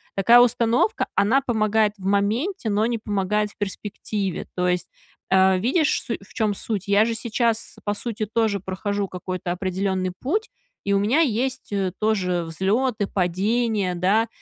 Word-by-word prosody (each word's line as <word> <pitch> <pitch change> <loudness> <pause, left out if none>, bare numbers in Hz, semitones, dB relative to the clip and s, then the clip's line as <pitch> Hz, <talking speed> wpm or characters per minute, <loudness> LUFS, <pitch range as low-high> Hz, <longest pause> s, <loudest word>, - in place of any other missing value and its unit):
Такая 230 +5 +6
установка, 240 - +2
она 245 +7 +3
помогает 220 -4 +1
в 190 - -11
моменте, 220 - 0
но 210 +1 +2
не 235 0 0
помогает 210 0 -1
в - - -26
перспективе. 200 -1 -4
То 180 0 0
есть, 180 0 0 0.4
э, 190 0 +4
видишь 280 - +1
су 230 - -3
в 195 - -17
чём 215 -4 0
суть. 200 -1 -4
Я 205 +2 +5
же 230 -1 -1
сейчас 230 0 -1
по 205 - 0
сути 220 0 -1
тоже 215 -1 0
прохожу 200 +2 -3
какой-то 185 -1 -4
определенный 185 0 -1
путь 410 - -1 0.3
и 200 - -1
у 195 - +3
меня 225 +10 +2
есть, 260 -2 -1
э, 190 -2 -1
тоже 185 -5 +1
взлеты, 205 +7 0
падения. 195 +2 0
Да. 205 +6 +2
205 Hz, 160 wpm, -23 LUFS, 190-230 Hz, 0.4 s, Такая